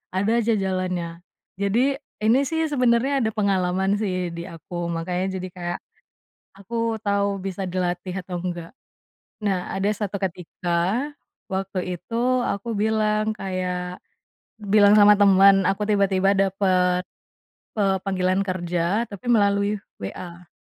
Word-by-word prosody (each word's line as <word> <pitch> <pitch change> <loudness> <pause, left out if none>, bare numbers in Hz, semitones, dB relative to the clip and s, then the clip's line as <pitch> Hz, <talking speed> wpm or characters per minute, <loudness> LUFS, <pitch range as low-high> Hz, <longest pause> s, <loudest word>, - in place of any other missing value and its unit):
ada 200 +4 +1
aja 230 0 +2
jalannya 185 -3 -2 0.4
jadi 245 +8 +1 0.2
ini 235 +5 +4
sih 320 +1 0
sebenarnya 255 +1 +2
ada 220 - +1
pengalaman 190 -1 +1
sih 185 -4 -1
di 170 0 -6
aku 170 +1 -6
makanya 180 +3 -2
jadi 185 - -5
kayak, 175 -1 -4 0.8
aku 225 +2 -2
tau 200 -1 0
bisa 195 0 -4
dilatih 180 0 -2
atau 180 0 -7
enggak, 175 -2 -5 0.7
nah 190 -3 -1
ada 195 +1 0
satu 205 -1 -3
ketika 180 - -1 0.4
waktu 190 -1 -2
itu 230 +6 -3 0.2
aku 225 +3 -2
bilang 215 0 +1
kayak, 180 -1 -3 0.6
bilang 205 0 +5
sama 210 0 +8
teman 195 -1 +6
aku 195 +2 0
tiba-tiba 195 -1 +3
dapet, 185 -2 +2 0.8
eee, 195 -2 +3
panggilan 185 -1 +1
kerja 180 +3 0
tapi 200 +3 -10
melalui 200 -2 +3 0.2
WhatsApp. 175 - -8
195 Hz, 120 wpm, -23 LUFS, 180-210 Hz, 0.8 s, sama